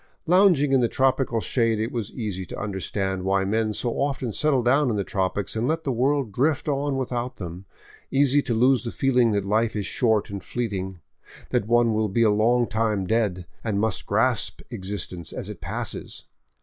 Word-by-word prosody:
Lounging 175 -6 +4
in 130 - +5
the 120 - +3
tropical 130 -1 +1
shade 115 +1 +1
it 110 +2 -2
was 115 -4 -4
easy 105 -6 -4
to - - -7
understand 95 -1 -2
why 95 +1 +1
men 110 +2 0
so 120 +3 -2
often 135 -5 -1
settle 140 -2 +2
down 135 +3 +3
in 110 - 0
the 100 - 0
tropics 95 -1 -2
and 115 +2 0
let 160 +2 0
the 140 - -1
world 130 0 +1
drift 140 +8 0
on 140 -1 0
without 125 -1 -3
them, 90 0 -7 0.4
easy 140 +1 +3
to 120 - -2
lose 130 +3 +3
the 120 - -3
feeling 125 -2 +2
that 100 -1 0
life 110 +3 +1
is 105 -2 -2
short 110 -2 +1
and 100 -1 -6
fleeting, 95 -6 -3 0.5
that 100 - 0
one 120 -1 +3
will 110 0 0
be 115 +4 +2
a 110 - +4
long 120 +4 +3
time 110 -4 0
dead, 100 -4 0 0.2
and 105 -3 -1
must 110 -2 -1
grasp - - +1
existence 95 -3 -4
as - - -5
it - - -11
passes. - - -5
115 Hz, 190 wpm, -24 LUFS, 100-130 Hz, 0.5 s, in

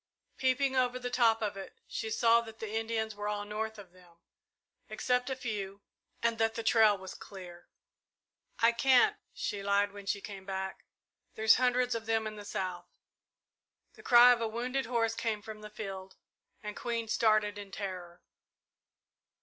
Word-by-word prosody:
Peeping 265 +1 +1
over 255 -1 +2
the 250 -1 -5
top 225 -3 +3
of 205 -1 -2
it, 195 - -9
she 220 - -4
saw 230 +1 +4
that 225 -1 -11
the 220 -1 -6
Indians 220 0 -1
were 205 0 -5
all 205 0 -2
north 220 +1 -4
of 195 -4 -12
them, 175 -2 -21 0.7
except 250 +1 0
a 265 - -1
few, 205 -5 -5 0.4
and 230 -1 +1
that 225 0 +1
the 230 - -3
trail 220 -2 +5
was 190 -1 -8
clear. 180 -3 -11 0.9
"I 230 +1 +5
can't," 250 +1 +4
she - - -4
lied, 200 0 +2
when 200 -1 -11
she 200 - 0
came 195 -1 -9
back. 190 0 -5 0.5
"There's 220 0 +5
hundreds 250 0 +2
of 225 -1 -4
them 225 -1 +1
in 215 0 -5
the 205 -1 -9
south." 185 -3 -4 1.1
The - - -15
cry 245 0 +8
of 240 -1 +2
a 225 - 0
wounded 245 +3 -2
horse 230 -2 +1
came 220 -2 -2
from 215 -1 -9
the 210 - -9
field, 195 -3 -7 0.5
and 210 0 -5
Queen 230 -1 -3
started 215 -2 +2
in 200 -1 -8
terror. 180 -3 -6
220 Hz, 170 wpm, -31 LUFS, 200-235 Hz, 1.1 s, cry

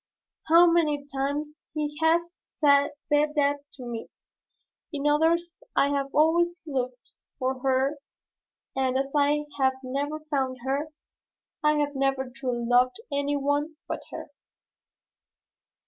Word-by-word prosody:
How 335 +2 +8
many 310 -4 +2
times 290 +3 -2
he 295 -1 -2
has 340 +2 +2 0.2
said 285 -1 +5 0.2
to 290 -2 +1
me, 235 -2 -5 0.8
'In 290 -2 -4
others 330 +3 +2 0.2
I 280 - +4
have 280 -1 0
always 340 +4 +3
looked 255 -4 -4 0.2
for 260 -1 -1
her 270 +2 +1 0.8
and 260 -1 +1
as 270 +1 -2
I 295 +1 +3
have 265 -1 +4
never 285 +4 -2
found 270 -4 -1
her, 280 +3 0 0.8
I 300 0 +5
have 290 -1 0
never 270 -1 0
truly 250 -3 -2
loved 245 +3 +4 0.2
any 285 0 0
one 290 +3 0
but - - -4
her.'" - - -8
285 Hz, 120 wpm, -27 LUFS, 265-300 Hz, 0.8 s, How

